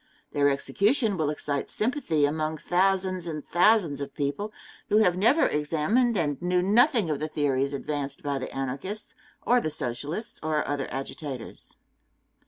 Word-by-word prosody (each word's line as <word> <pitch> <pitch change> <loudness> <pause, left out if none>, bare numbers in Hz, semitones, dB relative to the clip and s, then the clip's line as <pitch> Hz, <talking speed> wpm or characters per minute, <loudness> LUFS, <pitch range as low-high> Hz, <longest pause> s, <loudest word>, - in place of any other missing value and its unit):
Their 145 0 +3
execution 205 - +1
will 155 -4 0
excite 145 -2 -2
sympathy 215 - 0
among 155 +1 -1
thousands 185 0 +1
and 155 -3 -5
thousands 175 -6 +3
of 140 -1 -6
people 145 +9 -2 0.4
who 210 - +4
have 180 -5 +4
never 235 - +4
examined 170 - +1
and 145 -4 -1
knew 180 0 +1
nothing 225 - +4
of 145 - -1
the 155 - -2
theories 140 -3 0
advanced 145 +3 -4
by 140 -2 -1
the 130 - -5
Anarchists, 135 +11 -4 0.3
or 245 0 +4
the 155 - -1
Socialists, 145 - -4
or 155 -1 -1
other 145 -1 -2
agitators. 135 -1 -7
155 Hz, 150 wpm, -27 LUFS, 145-200 Hz, 0.4 s, who